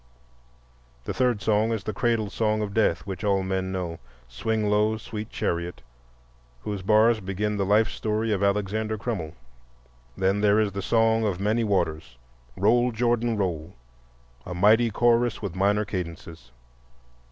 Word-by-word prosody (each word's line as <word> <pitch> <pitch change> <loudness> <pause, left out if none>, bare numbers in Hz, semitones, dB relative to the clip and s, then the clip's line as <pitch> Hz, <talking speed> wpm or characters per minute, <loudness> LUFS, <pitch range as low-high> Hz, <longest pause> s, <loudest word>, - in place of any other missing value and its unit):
The - - -4
third 125 -5 0
song 110 +2 +2
is 110 -3 -2
the 110 - -4
cradle 110 0 0
song 110 -1 0
of 100 -1 -5
death 100 -6 +1
which 95 +1 -6
all 100 -2 +1
men 95 0 -2
know,—"Swing 85 - -4
low, 105 +1 +2
sweet 110 0 -7
chariot,"—whose - - -6
bars 110 +3 +4
begin 105 +2 -2
the 100 -1 -1
life 105 +3 +4
story 110 +1 -2
of 100 -2 0
"Alexander 105 +2 0
Crummell." 100 -8 -4 0.8
Then 95 +2 +1
there 105 0 +4
is 105 -2 +1
the 100 0 -4
song 115 +2 +2
of 100 -4 -1
many 110 +4 +1
waters, 80 - -1 0.4
"Roll, 120 +5 +3
Jordan, 120 0 0
roll," 90 -3 -3 0.7
a 90 - -6
mighty 110 +6 +4
chorus 120 +1 +2
with 100 -5 -5
minor 100 +3 +2
cadences. 85 -8 -7
105 Hz, 140 wpm, -25 LUFS, 90-110 Hz, 0.8 s, bars